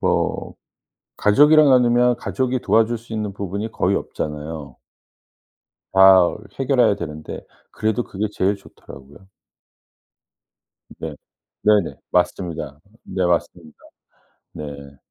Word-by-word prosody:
뭐 -, -, -1 dB, 0.6 s
가족이랑 150 Hz, +7 st, +5 dB
나누면 125 Hz, -1 st, +4 dB
가족이 130 Hz, 0 st, -2 dB
도와줄 110 Hz, +3 st, +2 dB
수 115 Hz, 0 st, -14 dB
있는 105 Hz, -2 st, -3 dB
부분이 100 Hz, +3 st, -5 dB
거의 100 Hz, -1 st, 0 dB
없잖아요. 75 Hz, -2 st, -6 dB, 1.2 s
다 95 Hz, -2 st, +6 dB, 0.2 s
해결해야 125 Hz, -6 st, +3 dB
되는데. 75 Hz, -2 st, -7 dB, 0.3 s
그래도 110 Hz, +2 st, -1 dB
그게 105 Hz, +3 st, -3 dB
제일 100 Hz, 0 st, 0 dB
좋더라고요. 70 Hz, -3 st, -15 dB, 1.7 s
네. -, -, -6 dB, 0.5 s
네네. 105 Hz, -4 st, +3 dB, 0.2 s
맞습니다. 85 Hz, -5 st, -1 dB, 0.2 s
네. 95 Hz, -1 st, -2 dB
맞습니다. 85 Hz, -2 st, -2 dB, 0.8 s
네. 70 Hz, -2 st, -9 dB
100 Hz, 235 characters per minute, -21 LUFS, 80-115 Hz, 1.7 s, 다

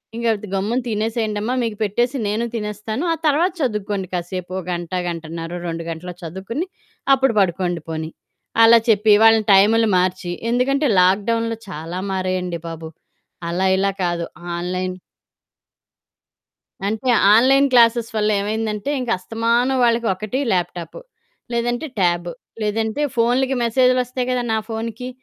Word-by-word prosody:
ఇంక 235 Hz, 0 st, -2 dB, 0.3 s
గమ్మున 210 Hz, +6 st, 0 dB
తినేసేయండమ్మా 220 Hz, 0 st, -1 dB
మీకు 225 Hz, -3 st, -3 dB
పెట్టేసి 240 Hz, +6 st, 0 dB
నేను 215 Hz, +3 st, -1 dB
తినేస్తాను 210 Hz, -, -4 dB
ఆ -, -, -1 dB
తర్వాత 315 Hz, +5 st, +3 dB
చదువుకోండి 210 Hz, -6 st, -2 dB
కాసేపు 180 Hz, +1 st, -4 dB
ఓ -, -, -1 dB
గంట, 175 Hz, -1 st, -4 dB, 0.2 s
గంటన్నర, 165 Hz, 0 st, -5 dB, 0.2 s
2 165 Hz, 0 st, -4 dB
గంటలో 180 Hz, +2 st, -6 dB
చదువుకొని 190 Hz, -, -4 dB, 0.5 s
అప్పుడు 265 Hz, -2 st, +2 dB
పడుకోండి 175 Hz, -2 st, 0 dB
పోనీ 160 Hz, 0 st, -4 dB, 0.5 s
అలా 230 Hz, +1 st, +8 dB
చెప్పి, 210 Hz, 0 st, +5 dB
వాళ్ళ 225 Hz, 0 st, +7 dB, 0.2 s
టైములు 220 Hz, +4 st, +5 dB
మార్చి, 180 Hz, -1 st, -1 dB, 0.2 s
ఎందుకంటే 275 Hz, +4 st, +2 dB
లాక్‌డౌన్‌లో 225 Hz, +5 st, +2 dB
చాలా 165 Hz, +1 st, -5 dB
మారాయండి 185 Hz, -2 st, -2 dB
బాబు. 165 Hz, -1 st, -7 dB, 0.6 s
అలా 180 Hz, +3 st, 0 dB
ఇలా 195 Hz, +1 st, +1 dB
కాదు 175 Hz, -1 st, -1 dB, 0.3 s
ఆన్‌లైన్ 185 Hz, +1 st, -3 dB, 1.9 s
అంటే 220 Hz, +4 st, -3 dB, 0.3 s
ఆన్‌లైన్ 270 Hz, +5 st, +5 dB
క్లాసెస్ 235 Hz, -1 st, +4 dB
వల్ల 210 Hz, 0 st, +1 dB
ఏమైందంటే 215 Hz, +3 st, -2 dB
ఇంకా 245 Hz, -2 st, -1 dB
అస్తమానం 230 Hz, +6 st, 0 dB
వాళ్ళకి 235 Hz, -1 st, +2 dB
ఒకటి 215 Hz, +6 st, -4 dB
ల్యాప్‌టాపు, 175 Hz, -, -3 dB, 0.5 s
లేదంటే 240 Hz, +5 st, -1 dB
ట్యాబు, 175 Hz, -2 st, +1 dB, 0.3 s
లేదంటే 220 Hz, +5 st, -1 dB
ఫోనులకి 250 Hz, +3 st, +2 dB
మెసేజులొస్తాయి 250 Hz, +1 st, +1 dB
కదా! 250 Hz, -1 st, 0 dB
నా 220 Hz, -, +2 dB
ఫోనుకి 230 Hz, +2 st, -5 dB
215 Hz, 125 wpm, -20 LUFS, 185-235 Hz, 1.9 s, అలా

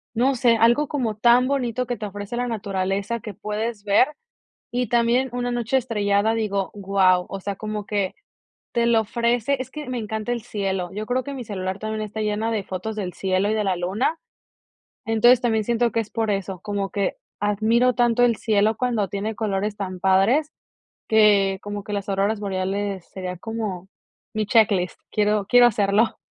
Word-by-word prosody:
no 260 Hz, +4 st, +2 dB
sé, 235 Hz, -1 st, +4 dB
algo 240 Hz, +6 st, +3 dB
como 240 Hz, -7 st, -2 dB
tan 240 Hz, +3 st, +5 dB
bonito 250 Hz, -3 st, -1 dB
que 245 Hz, 0 st, -3 dB
te 210 Hz, -, -5 dB
ofrece 205 Hz, +3 st, -6 dB
la 245 Hz, -, -1 dB
naturaleza, 200 Hz, 0 st, -2 dB
que 210 Hz, -1 st, -8 dB
puedes 210 Hz, +2 st, -4 dB
ver, 205 Hz, +5 st, +4 dB, 0.6 s
y 245 Hz, -1 st, -1 dB
también 240 Hz, +3 st, +2 dB
una 245 Hz, 0 st, -2 dB
noche 240 Hz, +1 st, 0 dB
estrellada, 210 Hz, -3 st, +1 dB
digo, 200 Hz, -3 st, -1 dB
guau, 190 Hz, -2 st, +2 dB
o 195 Hz, -, -6 dB
sea, 200 Hz, 0 st, -4 dB
como 215 Hz, -1 st, -4 dB
que 200 Hz, -3 st, -1 dB, 0.6 s
te 235 Hz, 0 st, +1 dB
lo 230 Hz, -1 st, +4 dB
ofrece, 235 Hz, +4 st, 0 dB
es 260 Hz, +1 st, -6 dB
que 300 Hz, -4 st, -7 dB
me 255 Hz, -, -2 dB
encanta 220 Hz, +1 st, -3 dB
el 235 Hz, -3 st, -2 dB
cielo, 195 Hz, -5 st, -3 dB
yo 215 Hz, +1 st, -4 dB
creo 255 Hz, +1 st, 0 dB
que 280 Hz, -, -6 dB
mi 255 Hz, -3 st, -5 dB
celular 190 Hz, -1 st, -4 dB
también 215 Hz, 0 st, -3 dB
está 215 Hz, +1 st, -5 dB
lleno 215 Hz, +2 st, -1 dB
de 215 Hz, -3 st, -1 dB
fotos 195 Hz, +4 st, -5 dB
del 185 Hz, -4 st, -4 dB
cielo 190 Hz, +1 st, 0 dB
y -, -, +1 dB
de 215 Hz, -, 0 dB
la 190 Hz, -2 st, +1 dB
luna, 210 Hz, -, -1 dB, 0.9 s
entonces, 235 Hz, +2 st, +5 dB
también 220 Hz, -3 st, +1 dB
siento 235 Hz, +1 st, +1 dB
que 230 Hz, -, 0 dB
es 215 Hz, -, -9 dB
por 220 Hz, -2 st, 0 dB
eso, 195 Hz, -2 st, -3 dB
como 205 Hz, -2 st, -3 dB
que 200 Hz, -2 st, -1 dB, 0.2 s
admiro 220 Hz, +5 st, +2 dB
tanto 240 Hz, 0 st, +3 dB
el 235 Hz, -2 st, +4 dB
cielo 215 Hz, 0 st, +2 dB
cuando 235 Hz, -6 st, 0 dB
tiene 205 Hz, +3 st, -3 dB
colores 205 Hz, -1 st, -1 dB
tan 185 Hz, -2 st, -5 dB
padres 200 Hz, -, +3 dB, 0.6 s
que 200 Hz, -3 st, +4 dB
como 205 Hz, -1 st, -5 dB
que 210 Hz, -, -5 dB
las 200 Hz, 0 st, -3 dB
auroras 200 Hz, +2 st, 0 dB
boreales 195 Hz, -1 st, -2 dB
sería 185 Hz, -2 st, -5 dB
como 205 Hz, -4 st, -5 dB, 0.5 s
mi 215 Hz, -1 st, -1 dB
checklist, 200 Hz, -5 st, +2 dB
quiero 210 Hz, -1 st, +1 dB
quiero 245 Hz, +1 st, +7 dB
hacerlo. 210 Hz, +1 st, +2 dB
215 Hz, 185 wpm, -23 LUFS, 200-235 Hz, 0.9 s, quiero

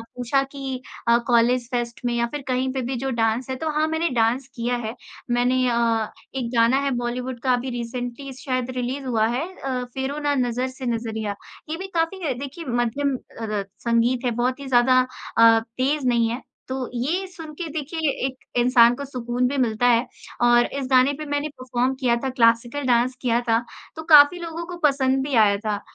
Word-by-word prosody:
पूछा 250 Hz, +2 st, +1 dB
कि 270 Hz, -2 st, -5 dB, 0.3 s
अ, 235 Hz, 0 st, +6 dB
college 240 Hz, 0 st, +3 dB
fest 240 Hz, -1 st, -2 dB
में 240 Hz, -, +1 dB
या 235 Hz, 0 st, +1 dB
फिर 295 Hz, -, -4 dB
कहीं 255 Hz, 0 st, 0 dB
पे 265 Hz, -, -2 dB
भी 260 Hz, +1 st, -2 dB
जो 265 Hz, +2 st, -2 dB
डांस 230 Hz, +2 st, 0 dB
है 260 Hz, -, -2 dB
तो 315 Hz, +4 st, -3 dB
हाँ 310 Hz, +1 st, +2 dB
मैंने 320 Hz, +1 st, 0 dB
डांस 240 Hz, +3 st, +1 dB
किया 240 Hz, +1 st, -1 dB
है। 225 Hz, -2 st, -4 dB, 0.4 s
मैंने 245 Hz, +1 st, +2 dB
अ, 230 Hz, -2 st, +1 dB, 0.3 s
एक 245 Hz, -3 st, -2 dB
गाना 230 Hz, +3 st, +4 dB
है 280 Hz, -1 st, 0 dB
बॉलीवुड 245 Hz, +1 st, -3 dB
का 255 Hz, -2 st, +3 dB
अभी 250 Hz, +1 st, -1 dB
रिसेंटली 245 Hz, +2 st, -5 dB
शायद 255 Hz, -2 st, -2 dB
रिलीज 255 Hz, +2 st, -3 dB
हुआ 225 Hz, -4 st, +1 dB
है 245 Hz, +5 st, -1 dB, 0.2 s
अ, 255 Hz, -2 st, -2 dB
"फेरों 270 Hz, +2 st, -3 dB
ना 290 Hz, -1 st, 0 dB
नज़र 250 Hz, 0 st, 0 dB
से 260 Hz, 0 st, -8 dB
नजरिया"। 220 Hz, -3 st, -2 dB, 0.3 s
ये 325 Hz, -, -3 dB
भी 385 Hz, +1 st, -6 dB
काफी 330 Hz, -3 st, 0 dB
देखिए 280 Hz, +6 st, -7 dB
मध्यम 245 Hz, +3 st, 0 dB, 0.3 s
अरत 210 Hz, -3 st, -3 dB
संगीत 235 Hz, +2 st, +1 dB
है 245 Hz, -, +2 dB
बहुत 255 Hz, +2 st, 0 dB
ही 275 Hz, -, -7 dB
ज़्यादा 255 Hz, 0 st, +5 dB, 0.4 s
अ, 230 Hz, 0 st, +7 dB
तेज़ 255 Hz, +5 st, -1 dB
नहीं 235 Hz, -2 st, +3 dB
है। 235 Hz, +3 st, -4 dB, 0.3 s
तो 260 Hz, -1 st, -3 dB
ये 320 Hz, +11 st, -1 dB
सुन 325 Hz, -4 st, -10 dB
के 335 Hz, +3 st, -5 dB
देखिए, 310 Hz, +1 st, -2 dB, 0.2 s
एक 260 Hz, -1 st, -3 dB, 0.2 s
इंसान 240 Hz, -1 st, +6 dB
को 280 Hz, -, -4 dB
सुकून 250 Hz, -1 st, -1 dB
भी 280 Hz, +2 st, -2 dB
मिलता 245 Hz, -1 st, +2 dB
है 240 Hz, +1 st, +3 dB, 0.3 s
और 240 Hz, 0 st, +5 dB
इस 275 Hz, -2 st, -4 dB
गाने 255 Hz, +2 st, +5 dB
पे 305 Hz, -, -6 dB
मैंने 290 Hz, +1 st, -2 dB
परफॉर्म 255 Hz, 0 st, 0 dB
किया 245 Hz, -3 st, +2 dB
था, 265 Hz, -, 0 dB
क्लासिकल 240 Hz, +2 st, +2 dB
डांस 245 Hz, +1 st, +2 dB
किया 240 Hz, -1 st, +1 dB
था, 225 Hz, 0 st, +4 dB, 0.4 s
तो 320 Hz, -, -6 dB
काफ़ी 310 Hz, +1 st, +7 dB
लोगों 335 Hz, 0 st, -5 dB
को 355 Hz, -1 st, -7 dB
पसंद 270 Hz, -1 st, +1 dB
भी 275 Hz, -, -1 dB
आया 210 Hz, -3 st, +5 dB
था। 210 Hz, -1 st, -1 dB
255 Hz, 200 wpm, -23 LUFS, 235-275 Hz, 0.4 s, अ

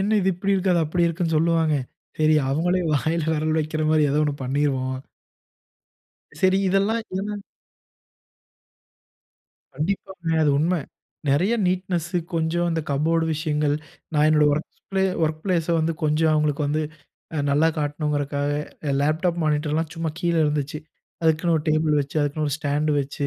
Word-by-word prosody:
"என்னா 210 Hz, +3 st, +1 dB
இது 190 Hz, -, +2 dB
இப்படி 195 Hz, +2 st, 0 dB
இருக்கு?" 190 Hz, -1 st, +2 dB
அது 170 Hz, -, +3 dB
அப்படி 170 Hz, +3 st, +1 dB
இருக்குன்னு? 170 Hz, -1 st, 0 dB
சொல்லுவாங்க. 160 Hz, -1 st, +2 dB, 0.4 s
சரி! 155 Hz, 0 st, +4 dB, 0.2 s
அவங்களே 175 Hz, +5 st, +1 dB
வாயில 160 Hz, +3 st, 0 dB
வெரல் 155 Hz, +1 st, 0 dB
வெக்குற 155 Hz, 0 st, -1 dB
மாரி 155 Hz, -2 st, +4 dB
ஏதோ 150 Hz, +2 st, +2 dB
ஒண்ணு 145 Hz, -1 st, -1 dB
பண்ணிருவோம்." 130 Hz, -1 st, 0 dB, 1.5 s
சரி 190 Hz, 0 st, +4 dB
இதெல்லாம் 200 Hz, +4 st, +2 dB, 0.2 s
ஏன்னா? 210 Hz, +1 st, -3 dB, 2.4 s
கண்டிப்பாங்க 175 Hz, +2 st, -3 dB
அது 145 Hz, -, +3 dB
உண்ம. 170 Hz, +4 st, +2 dB, 0.6 s
நெறையா 180 Hz, +12 st, +2 dB
நீட்னெஸு, 180 Hz, -1 st, -1 dB, 0.2 s
கொஞ்சம் 165 Hz, +1 st, 0 dB
அந்த 165 Hz, -1 st, -1 dB
கபோர்டு 160 Hz, +4 st, +1 dB
விஷயங்கள். 150 Hz, -2 st, 0 dB, 0.4 s
நான் 150 Hz, 0 st, +4 dB
என்னோட 150 Hz, -1 st, +4 dB
வொர்க் 155 Hz, +2 st, -2 dB, 0.2 s
ப்ளே 190 Hz, -, +2 dB, 0.2 s
வொர்க் 155 Hz, -1 st, 0 dB
பிளேஸ 175 Hz, -4 st, 0 dB
வந்து 160 Hz, +1 st, +1 dB
கொஞ்சம் 155 Hz, +1 st, +2 dB
அவுங்களுக்கு 150 Hz, -1 st, +1 dB
வந்து 155 Hz, +2 st, 0 dB, 0.5 s
அ -, -, -1 dB
நல்லா 150 Hz, +3 st, +4 dB
காட்டணும்ங்குறதுக்காக, 145 Hz, -1 st, -1 dB, 0.4 s
எ -, -, +1 dB
லேப்டாப் 165 Hz, +4 st, +1 dB
மானிட்டர்லாம் 155 Hz, +1 st, 0 dB
சும்மா 165 Hz, -1 st, -2 dB
கீழ 170 Hz, -1 st, +1 dB
இருந்துச்சு. 150 Hz, 0 st, -1 dB, 0.4 s
அதுக்குன்னு 165 Hz, +1 st, +2 dB
ஒரு 150 Hz, -, -3 dB
டேபிள் 155 Hz, -1 st, +2 dB
வெச்சு, 140 Hz, +2 st, -5 dB
அதுக்குன்னு 145 Hz, +1 st, -1 dB
ஒரு 140 Hz, -, -1 dB
ஸ்டாண்டு 150 Hz, 0 st, 0 dB
வெச்சு, 140 Hz, +1 st, -3 dB
155 Hz, 145 wpm, -23 LUFS, 150-170 Hz, 2.4 s, சரி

